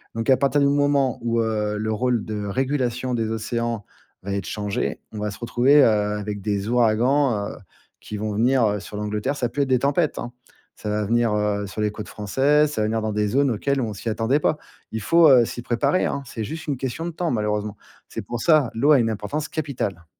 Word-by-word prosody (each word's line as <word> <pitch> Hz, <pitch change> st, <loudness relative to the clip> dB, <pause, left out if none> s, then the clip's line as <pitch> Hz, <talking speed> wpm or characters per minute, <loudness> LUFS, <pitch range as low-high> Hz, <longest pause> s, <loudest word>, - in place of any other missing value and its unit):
Donc 115 Hz, +2 st, -2 dB
à 130 Hz, -, +6 dB
partir 140 Hz, +1 st, +2 dB
du 140 Hz, -, +4 dB
moment 140 Hz, -3 st, +2 dB
où, 115 Hz, 0 st, 0 dB
heu, 105 Hz, -2 st, -1 dB
le 110 Hz, +1 st, -2 dB
rôle 120 Hz, 0 st, 0 dB
de 105 Hz, -1 st, -4 dB
régulation 130 Hz, +2 st, -1 dB
des 115 Hz, -2 st, -1 dB
océans 115 Hz, 0 st, -2 dB, 0.4 s
va 100 Hz, 0 st, -3 dB
être 100 Hz, -, -2 dB
changé, 105 Hz, -1 st, -2 dB
on 105 Hz, -, -7 dB
va 105 Hz, 0 st, -2 dB
se 100 Hz, -, -9 dB
retrouver, 125 Hz, +5 st, +4 dB
heu, -, -, +6 dB, 0.3 s
avec 105 Hz, -1 st, -5 dB
des 100 Hz, 0 st, -2 dB
ouragans, 120 Hz, -1 st, +2 dB
heu, -, -, -10 dB, 0.4 s
qui 105 Hz, -, -7 dB
vont 105 Hz, 0 st, -3 dB
venir, 125 Hz, +3 st, +3 dB
heu, 105 Hz, -1 st, 0 dB
sur 105 Hz, -, -10 dB
l'Angleterre, 105 Hz, +6 st, -2 dB
ça 120 Hz, -, -1 dB
va -, -, -11 dB
plus 145 Hz, -, 0 dB
être 140 Hz, -, -3 dB
des 130 Hz, -1 st, +3 dB
tempêtes, 145 Hz, +4 st, +1 dB
hein. 120 Hz, -, -5 dB, 0.5 s
Ça 105 Hz, -, -5 dB
va 105 Hz, 0 st, 0 dB
venir, 115 Hz, 0 st, +2 dB
heu, 105 Hz, -1 st, 0 dB
sur 100 Hz, -, -8 dB
les 105 Hz, -, +1 dB
côtes 105 Hz, 0 st, -8 dB
françaises, 145 Hz, +8 st, +2 dB
ça 110 Hz, -, -1 dB
va 105 Hz, -, +1 dB
venir 110 Hz, 0 st, -1 dB
dans 110 Hz, -1 st, -2 dB
des 105 Hz, 0 st, +1 dB
zones 140 Hz, +3 st, +2 dB
auxquelles 140 Hz, +5 st, 0 dB
on 110 Hz, -4 st, -2 dB
s'y 110 Hz, +3 st, -5 dB
attendait 115 Hz, +7 st, +1 dB
pas. 155 Hz, -, +1 dB, 0.3 s
Il 110 Hz, -, -3 dB
faut, 165 Hz, +6 st, +5 dB
heu, 125 Hz, -3 st, +7 dB
s'y 120 Hz, -, -6 dB
préparer, 120 Hz, +10 st, +1 dB
hein. 140 Hz, -, -2 dB
C'est 115 Hz, -3 st, -5 dB
juste 160 Hz, +7 st, -6 dB
une 145 Hz, -, 0 dB
question 135 Hz, +6 st, -4 dB
de 175 Hz, -, -3 dB
temps 165 Hz, -1 st, -2 dB
malheureusement. 105 Hz, -2 st, -2 dB, 0.3 s
C'est -, -, -5 dB
pour 120 Hz, -1 st, -5 dB
ça 155 Hz, -7 st, +4 dB
l'eau 140 Hz, +7 st, +3 dB
a 140 Hz, -, +6 dB
une 115 Hz, -1 st, +1 dB
importance 110 Hz, +9 st, -3 dB
capitale. 135 Hz, -, -4 dB
115 Hz, 230 wpm, -23 LUFS, 105-140 Hz, 0.5 s, heu